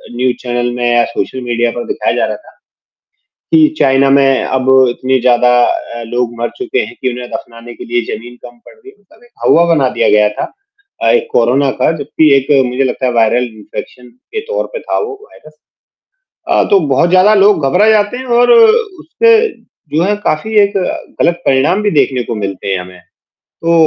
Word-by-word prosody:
News 125 0 0
channel 120 0 -2
में 120 0 -3
या 120 0 +3
social 125 +2 -5
media 120 -1 -1
पर 120 0 -6
दिखाया - - -2
जा - - +1
रहा - - -4
था - - -16 1.0
कि 315 -1 +6
चाइना 135 0 +3
में 135 -1 +3
अब 130 0 -1 0.2
इतने 130 +2 -1
ज़्यादा 125 0 +3 0.2
अ, 120 0 -4
लोग 120 0 -2
मर 120 - -2
चुके 380 +1 -2
हैं - - -12
कि 130 - 0
उन्हें 125 0 -8
दफनाने 120 0 -9
के - - -11
लिए 120 0 -1
जमीन 120 +3 -9
कम 120 0 -13
पड़ - - -15
रही 430 -3 -16
है। - - -27
मतलब 205 +4 -24
एक 240 - -23
हौवा 170 +1 +4
बना 135 -5 +1
दिया - - 0
गया 105 0 +3
था। 105 - -6 0.5
अ, - - +2
एक 470 - +1
कोरोना 130 +4 +2
का - - +3
जबकि 150 +1 +1
एक 135 +2 0 0.2
मुझे 125 +2 -1
लगता 130 0 -2
है 125 - +1
वायरल 115 +2 +2
इंफेक्शन 125 +3 -10
के 355 - -9
तौर - - -2
पे 480 - -4
था - - -3
वो 435 0 -4
वायरस। 155 - -18 0.9
अ, - - +3
तो 200 -2 +5
बहुत 170 - +2
ज़्यादा 185 +4 +4
लोग 200 -6 +3
घबरा 195 +9 +3
जाते 210 +2 +1
हैं 260 - -8
और 245 - +3
उससे 450 -2 +3 0.6
जो 165 - +2
है, 205 +3 +1
काफ़ी 210 +2 -3
एक 200 0 +2 0.5
गलत 175 0 +1
परिणाम 150 +10 +2
भी 205 - +1
देखने 135 -4 +1
को 115 - -5
मिलते 100 -2 -5
हैं 95 - 0
हमें, 90 0 -12 0.6
तो 170 0 +1
135 Hz, 200 wpm, -13 LUFS, 120-205 Hz, 1.0 s, कि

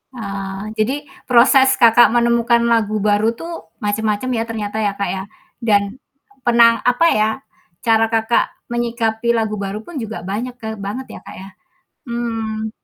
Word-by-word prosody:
Ah, 195 -2 -5
jadi 270 +8 -1 0.2
proses 265 +2 +5
Kakak 235 -1 +6
menemukan 235 0 +3
lagu 215 -2 +1
baru 210 +2 +3
tuh 330 - -8
macam-macam 210 +3 -1
ya 225 - 0
ternyata 215 -1 -4
ya 205 - +1
Kak 200 - 0
ya, 190 0 -3 0.4
dan 205 -1 +2 0.5
pernah 235 -1 +4
apa 250 +6 +3
ya, 215 0 +3 0.6
cara 225 -1 +4
Kakak 225 +1 +2 0.2
menyikapi 235 -1 -1
lagu 220 -2 0
baru 200 0 -4
pun 345 - -10
juga 220 +1 -6
banyak 240 +5 -4
ka 220 -1 -5
banget 250 +6 -4
ya - - -9
Kak - - -10
ya. 190 - -9 0.6
Mmm, 225 -2 -3
225 Hz, 150 wpm, -19 LUFS, 210-240 Hz, 0.6 s, Kakak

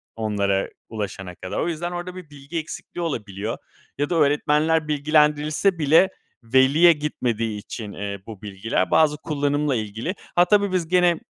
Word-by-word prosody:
onlara 100 -3 0 0.2
ulaşana 95 -4 -5
kadar. 95 - -5
O - - 0
yüzden 175 +1 -3
orada 175 +1 -5
bir 180 -5 -10
bilgi 145 +3 -6
eksikliği 165 +2 -7
olabiliyor 105 - -4 0.4
ya 145 +1 -1
da 175 - 0
öğretmenler 150 +1 +2
bilgilendirilse 150 +4 +2
bile 160 +6 +5 0.3
veliye 135 +8 +5
gitmediği 115 -7 -2
için, 105 0 -7
eee, 100 0 -5
bu 110 -4 -9
bilgiler 100 -2 -2
bazı 150 -2 +4
kullanımla 145 -2 0
ilgili. 110 - -3 0.2
Ha, 175 0 +6
tabii 200 0 +3
biz 175 -3 0
gene, 180 -2 +3
145 Hz, 150 wpm, -23 LUFS, 110-165 Hz, 0.4 s, Ha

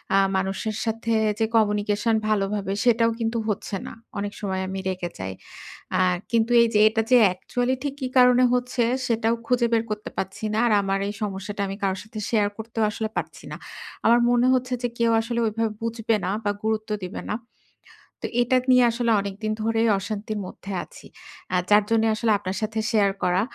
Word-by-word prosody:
আ - - +6 0.2
মানুষের 195 +3 -2
সাথে 225 +1 -2 0.3
যে 225 - +3
কমিউনিকেশন 210 +1 +2
ভালোভাবে 200 -1 0
সেটাও 230 -1 +4
কিন্তু 230 +1 -1
হচ্ছে 205 -1 -3
না। - - -7 0.3
অনেক 205 0 -3
সময় 190 -2 -2
আমি 190 0 -4
রেগে 180 -2 -3
যাই। 95 0 -4 0.6
আ - - +1 0.3
কিন্তু 230 0 +2
এইযে 225 -2 +3
এটা 225 +1 0
যে 250 - +8
অ্যাকচুয়ালি 245 +7 -1
ঠিক 280 -1 -2
কি 260 - -2
কারণে 250 0 +6
হচ্ছে, 250 -1 0 0.2
সেটাও 230 0 +1
খুঁজে 245 -1 +2
বের 225 0 +3
করতে 210 0 -4
পারছি 190 +3 -4
না। - - 0
আর - - +2
আমার 195 0 -1
এই 205 - -3
সমস্যাটা 200 0 -4
আমি 195 - -4
কারো 190 -1 +1
সাথে 215 0 -8
শেয়ার 210 -3 +2
করতেও 225 0 -3
আসলে 220 +1 -3
পারছি - - -5
না। - - -4 0.5
আমার 235 +1 +6
মনে 245 +1 +3
হচ্ছে 255 0 0
যে - - +2
কেউ 230 -1 +2
আসলে 235 +1 -3
ওইভাবে 225 +1 -1
বুঝবে 230 -1 0
না - - -1
বা, 205 - +1
গুরুত্ব 220 0 -1
দিবে 180 - -6
না। - - 0 0.9
তো - - 0
এটা 245 +2 +3
নিয়ে 250 0 +6
আসলে 235 0 0
অনেকদিন 200 +2 -4
ধরে 225 0 +1 0.2
অশান্তির 215 +1 -4
মধ্যে 195 +2 -9
আছি। - - -15 0.5
আ - - +3
যার 210 0 +6
জন্যে 225 0 +3
আসলে 225 0 +1
আপনার 190 0 -4
সাথে 220 +1 -2
শেয়ার 205 -3 +3
করা। 180 +1 +2
220 Hz, 185 wpm, -24 LUFS, 205-230 Hz, 0.9 s, যে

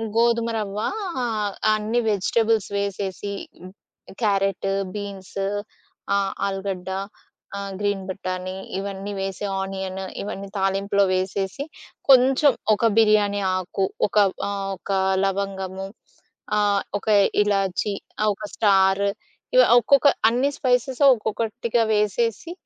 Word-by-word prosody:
గోధుమరవ్వ 230 -3 +1 0.5
ఆహ్, 210 -3 -1 0.2
అన్నీ 215 +3 0
వెజిటబుల్స్ 215 +1 +1
వేసేసి 200 0 -3 0.3
హ్మ్, 185 +1 -11 0.5
క్యారెట్, 195 -2 +1 0.3
బీన్స్. 200 -2 -7 0.8
ఆహ్, 195 -1 0
ఆలుగడ్డ. 195 -1 -3 0.7
ఆహ్, 200 0 -5
గ్రీన్ 205 -2 -1
బటానీ 185 0 -4 0.2
ఇవన్నీ 195 +1 -5
వేసి 195 +1 -3
ఆనియన్ 190 0 -4 0.2
ఇవన్నీ 200 -1 -5
తాలింపులో 195 +1 +1
వేసేసి 190 +6 -2 0.5
కొంచెం 265 +2 +6 0.2
ఒక 220 +2 +1
బిర్యానీ 210 -2 +4
ఆకు 185 +1 -1 0.2
ఒక 205 - -4 0.3
ఆహ్, 200 -1 -3
ఒక 200 - -7 0.3
లవంగము. 195 -1 -2 0.7
ఆహ్, 205 -1 +2 0.2
ఒక - - -18 0.4
ఇలాచీ 200 0 0 0.3
ఆ - - +3
ఒక 215 - -11
స్టార్. 195 -1 +3 0.5
ఇవ - - +9 0.2
ఒక్కొక్క 275 +5 +4 0.2
అన్ని 250 +5 +1
స్పైసెస్ 255 +1 0
ఒక్కొక్కటిగా 230 +1 -1
వేసేసి. 215 - 0
200 Hz, 105 wpm, -23 LUFS, 195-220 Hz, 0.8 s, ఇవ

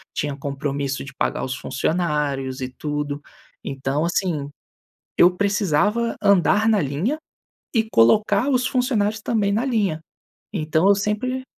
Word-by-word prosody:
tinha 145 -1 -2
compromisso 140 0 -3
de 135 - -10
pagar - - -1
os 130 0 -3
funcionários 140 -3 -1
e 130 - -3
tudo. 145 +1 -4 0.4
Então, 135 +3 -2
assim, 170 -5 -1 0.7
eu 175 - +7
precisava 205 +3 +1
andar 200 +2 +4
na 215 -3 +4
linha 160 - -1 0.5
e 225 -3 +1
colocar 205 - +4
os 255 -2 +2
funcionários 220 -5 0
também 210 -3 +1
na 225 +5 +1
linha. 205 - 0 0.5
Então 160 +1 +1
eu 200 - +6
sempre 215 +6 -2
180 Hz, 130 wpm, -22 LUFS, 145-215 Hz, 0.7 s, eu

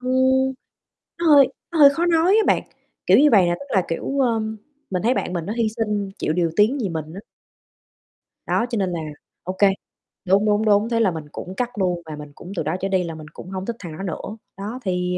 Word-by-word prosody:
Ừm, 260 +1 +2 0.7
nó 340 - -1
hơi 285 -4 +7 0.2
nó 330 - -1
hơi 285 -1 +10
khó 335 +5 -1
nói 345 +4 +4
á 440 - +4
bạn, - - +3 0.4
kiểu - - +6
như 295 +2 +6
vầy 200 -4 +7
nè, 175 - +1
tức 280 - -9
là, 190 - +4
kiểu, 220 +11 -3
ơ, 235 -4 +2 0.5
mình 180 -2 -1
thấy 240 +4 +2
bạn - - -2
mình 170 -3 -3
nó 210 - -2
hy 230 -2 +1
sinh, 210 -3 -1
chịu - - 0
điều 170 0 +1
tiếng 220 +7 +3
vì 200 - -1
mình 160 -3 -4
á. 195 - -7 1.3
Đó, 235 - +1
cho 235 - -1
nên 190 -3 0
là, 170 - -3 0.4
ô 185 - -4
kê 200 - +6 0.6
đúng, 195 +3 +3
đúng, 210 +1 +2
đúng, 210 +1 +3
thế 230 -1 +1
là 215 -5 +3
mình 160 -2 -6
cũng 185 - -7
cắt 245 +2 -1
luôn 180 -3 0
và 155 -1 -7
mình 150 -1 -10
cũng 180 - -10
từ 170 - -1
đó 155 +3 -1
trở 195 - -1
đi 190 -2 +1
là 165 -2 -5
mình 155 -1 -10
cũng 180 - -10
hông 190 0 -5
thích 235 - -3
thằng 175 -4 -8
đó 195 - -6
nữa. 195 +4 -5 0.2
Đó, 210 +6 -5
thì, 180 -2 -1
205 Hz, 245 wpm, -22 LUFS, 180-250 Hz, 1.3 s, hơi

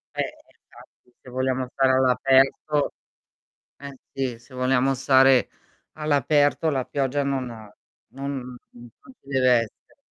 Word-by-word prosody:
Eh - - -1
esatto, 125 - -15
se - - -14
vogliamo 130 0 -1
stare 135 -1 +2
all'aperto 135 +3 +2 0.9
eh, 140 -1 -10 0.2
sì 130 -4 -3
se 120 +3 -19
vogliamo 130 +1 +1
stare 130 0 +4 0.4
all'aperto 150 +1 +1
la 135 -3 -1
pioggia 140 +1 -1
non 135 -2 -2 0.6
non 140 +1 -6
n 125 -1 -9
non 120 - -16
ci 135 - -23
deve 130 -2 +2 0.2
essere. 110 - -20
135 Hz, 125 wpm, -24 LUFS, 130-140 Hz, 0.9 s, stare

